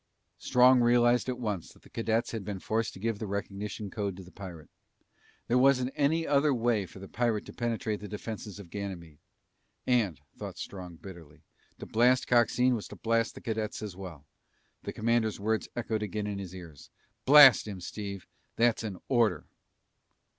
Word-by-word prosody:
Strong 125 +1 +5
realized 120 +1 +4
at 125 - -2
once 105 -8 -4
that - - -21
the - - -17
cadets 115 +1 0
had 110 -3 -4
been 100 0 -4
forced 110 +4 -1
to - - -12
give 110 0 -2
the 110 - -4
recognition 100 +1 -4
code 100 -4 -3
to 95 - -9
the 90 - -15
pirate. 85 -7 -10 0.8
There 125 +2 +3
wasn't 130 -1 +3
any 160 +3 +2
other 145 +1 +3
way 115 -5 +1
for 85 - -14
the 95 +1 -9
pirate 115 -2 -1
to - - -10
penetrate 115 -3 -2
the 105 - -8
defenses 105 -1 -6
of 95 -5 -12
Ganymede. 90 -7 -6 0.7
And, 110 - +1 0.2
thought - - -7
Strong 90 -3 -7
bitterly, 85 -4 -13 0.3
to - - -8
blast 125 +3 +3
Coxine 125 +1 +3
was 110 -4 -3
to - - -10
blast 115 0 0
the - - -10
cadets 110 -2 -3
as 100 -4 -6
well. 90 -7 -9 0.6
The - - -5
commander's 115 -1 0
words 110 +2 -1
echoed 110 -2 -2
again 105 0 -3
in 100 -1 -3
his 95 -2 -7
ears, 85 -6 -11 0.2
"... 110 0 -46
blast 140 -5 +9
him, 100 -3 -6
Steve! 100 0 -6 0.3
That's 120 -1 +3
an 105 -4 -5
order!" 115 - +2
110 Hz, 180 wpm, -29 LUFS, 100-120 Hz, 0.8 s, blast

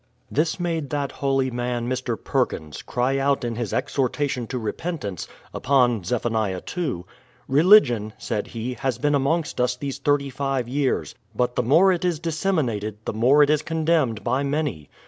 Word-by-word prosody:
This 160 +5 0
made 165 -5 -2
that 145 -2 -2
holy 135 -1 0
man, 120 0 -2
Mr. 125 -2 -2
Perkins, 80 - -2
cry 130 +3 0
out 140 -1 +1
in 120 -1 -2
his 115 -3 -3
ex 130 +3 -2
hortation 130 -2 0
to 130 - -4
repentance, 110 - -4 0.3
upon 125 -6 +2
Zeph. 120 +6 -2 0.5
ii. 145 - -2 0.4
"Religion," 135 - +5
said 110 -4 -3
he, 120 +2 -4
"has 130 -2 -2
been 145 +4 +1
amongst 145 +2 0
us 125 0 +1
these 135 +1 -5
thirty 140 0 +1
five 135 -2 -2
years; 135 +1 -1 0.2
but 125 0 0
the - - +2
more 160 +11 +5
it 180 -1 -1
is 175 -3 +1
disseminated, 155 - -1
the - - -2
more 130 +7 +5
it 145 - +3
is 150 -1 +2
condemned 155 -9 0
by 125 +5 +1
many. 140 - -2
135 Hz, 165 wpm, -23 LUFS, 120-150 Hz, 0.5 s, Religion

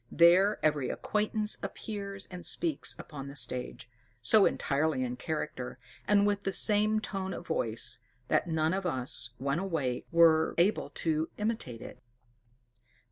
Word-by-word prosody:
There 185 +5 +5
every 150 -4 +1
acquaintance 210 0 -1
appears 200 -2 -5
and 180 -1 -7
speaks 155 -4 0
upon 140 -2 -8
the 140 - -9
stage, 125 -3 -2 0.4
so 200 - +6
entirely 145 -1 0
in 125 0 -3
character, 130 -2 -4 0.3
and 205 0 +4
with 205 -1 +1
the 195 - -1
same 210 +3 +3
tone 195 -3 -4
of 175 - -8
voice, 115 -9 -1 0.3
that - - +2
none 160 0 +1
of 190 -1 -1
us, 130 -4 -2
when 140 +4 -1
awake, 160 -10 -2
were 165 -1 +5
able 185 +5 +2 0.2
to 160 0 +1
imitate 210 - -3
it. - - -11
170 Hz, 140 wpm, -30 LUFS, 140-200 Hz, 0.4 s, so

